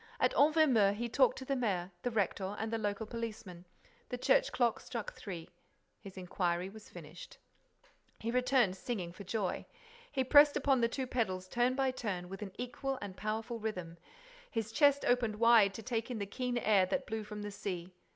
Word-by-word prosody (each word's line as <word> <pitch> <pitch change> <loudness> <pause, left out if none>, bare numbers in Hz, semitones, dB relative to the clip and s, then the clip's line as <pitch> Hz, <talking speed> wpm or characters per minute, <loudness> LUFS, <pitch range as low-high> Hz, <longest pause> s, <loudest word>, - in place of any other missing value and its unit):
At - - +3
Envermeu, 280 -10 +4
he 240 +3 -2
talked - - +3
to 260 - -7
the 275 - 0
mayor, 195 -8 -1
the 245 - -1
rector 200 -2 -1
and 220 +1 -3
the 225 - 0
local 205 +1 -2
policeman. 215 -6 -6 0.4
The 250 - -3
church - - +3
clock 240 -3 +1
struck 235 -4 -5
three. 175 -5 -7 0.5
His 195 -2 -11
inquiry 180 0 -1
was 220 0 -13
finished. 170 0 -11 0.8
He 230 - -3
returned 250 -5 +3
singing 185 -4 -4
for 200 - -9
joy. 200 0 -2 0.4
He 265 - +1
pressed 290 +3 +7
upon 270 -3 +2
the 230 - +4
two 260 +2 -3
pedals 190 -7 -2
turn 245 +5 +1
by 265 -1 +1
turn, 195 -8 -4
with 195 +1 -8
an 200 -2 -5
equal 260 +2 -3
and 200 -2 -7
powerful 220 +3 -3
rhythm; 180 -6 -5 0.5
his 225 -3 -3
chest 285 +3 +4
opened 240 -3 +2
wide 220 -3 +5
to 225 - -7
take 230 0 -2
in 245 - -3
the 200 - -2
keen 245 +4 -3
air 205 -5 +3
that 270 +6 -1
blew 220 0 -4
from 210 0 -7
the 205 - -5
sea. 185 -3 -5
220 Hz, 190 wpm, -33 LUFS, 195-250 Hz, 0.8 s, pressed